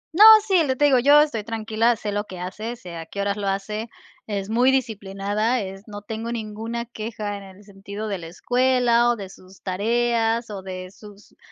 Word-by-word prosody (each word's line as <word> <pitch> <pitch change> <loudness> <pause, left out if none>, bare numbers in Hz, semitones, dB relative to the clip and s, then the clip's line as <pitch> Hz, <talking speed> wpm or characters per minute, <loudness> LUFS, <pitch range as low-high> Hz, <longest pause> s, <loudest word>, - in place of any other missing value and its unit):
No, 390 +6 +6 0.2
sí, 385 -4 +3
lo - - -2
que 260 - +1
te 290 - +3
digo, 270 -3 +5
yo 290 +4 +7
estoy 230 -9 -1
tranquila, 225 +1 +1
sé 210 -1 -4
lo 205 +1 -2
que 185 - -9
hace, 210 +6 -5
sé 175 -7 -9
a 165 - -7
que 200 +4 -5
horas 200 +1 -1
lo 205 -1 -3
hace, 210 +3 -2 0.4
es 200 -2 -3
muy 245 +4 +3
disciplinada, 215 -1 -1
es 195 +1 -8
no 205 -1 -8
tengo 225 +3 -5
ninguna 225 +1 -4
queja 215 -3 -5
en 200 - -10
el 195 +1 -14
sentido 200 +1 -7
de 200 - -2
la 165 -2 -9
escuela, 245 +4 +2
o 240 - +2
de 200 -4 -8
sus 185 0 -17
tareas, 230 +3 0
o 200 -2 -7
de 185 -1 -7
sus 205 0 -16
215 Hz, 210 wpm, -23 LUFS, 195-235 Hz, 0.4 s, yo